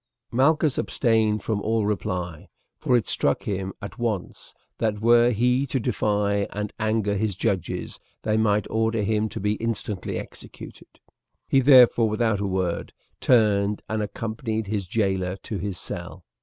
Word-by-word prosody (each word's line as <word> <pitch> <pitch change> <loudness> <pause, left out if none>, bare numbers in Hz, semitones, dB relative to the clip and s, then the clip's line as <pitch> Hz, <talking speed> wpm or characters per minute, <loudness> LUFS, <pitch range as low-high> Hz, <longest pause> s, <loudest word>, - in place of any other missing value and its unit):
Malchus 150 +3 +2
abstained 110 -4 +1
from 105 -2 -1
all 110 0 0
reply, 90 -5 -3 0.3
for 125 - +3
it 110 - -2
struck 70 - 0
him 95 -2 -3
at 100 - -8
once 110 -6 -4 0.2
that 110 -2 0
were 120 +2 +5
he 125 +4 +1
to 130 - -1
defy 105 -3 0
and 105 0 -4
anger 110 -2 0
his 105 -1 -1
judges 95 -2 -2 0.2
they 110 -1 +1
might 105 -1 +2
order 110 -1 +1
him 110 +1 0
to - - -6
be 105 +1 0
instantly 110 -4 -3
executed. - - -11 0.5
He 135 - +4
therefore 125 -4 +6
without 110 -1 +1
a 100 - -1
word 95 -2 -2 0.3
turned 105 -4 +3
and 110 0 -2
accompanied 110 +1 -3
his 100 -2 -3
jailer 95 -3 0
to 105 - -4
his 100 0 -4
cell. - - -6
110 Hz, 150 wpm, -24 LUFS, 100-115 Hz, 0.5 s, therefore